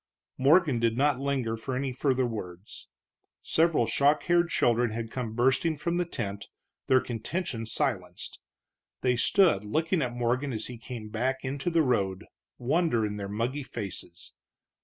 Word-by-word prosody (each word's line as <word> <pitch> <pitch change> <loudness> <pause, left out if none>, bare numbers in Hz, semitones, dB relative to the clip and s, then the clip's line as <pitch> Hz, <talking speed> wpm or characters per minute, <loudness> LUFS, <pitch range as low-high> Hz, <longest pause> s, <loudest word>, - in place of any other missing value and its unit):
Morgan 145 -1 +4
did 115 0 +1
not 140 -1 +2
linger 135 -5 -1
for 125 +3 -4
any 135 +1 -1
further 130 0 +1
words. 100 -4 -7 0.6
Several 160 -7 +3
shock 145 +5 +2
haired 170 0 +3
children 120 -3 +2
had 115 +1 -5
come 115 -3 -4
bursting 135 +7 +2
from 170 +4 -2
the 175 - +1
tent, 100 -10 -5 0.4
their 130 - +5
contention 120 - -4
silenced. 90 -7 -3 0.6
They 125 -1 +2
stood 155 - +3
looking 160 - 0
at 120 -2 -2
Morgan 125 +3 0
as 110 -1 -3
he 125 -2 -7
came 115 -2 -7
back 130 +5 -1
into 140 +5 -2
the 165 -2 +3
road, 100 -7 0 0.3
wonder 130 -3 +1
in 105 0 -4
their 100 -1 -5
muggy 120 +7 -2
faces. 100 -9 -7
125 Hz, 155 wpm, -28 LUFS, 110-145 Hz, 0.6 s, their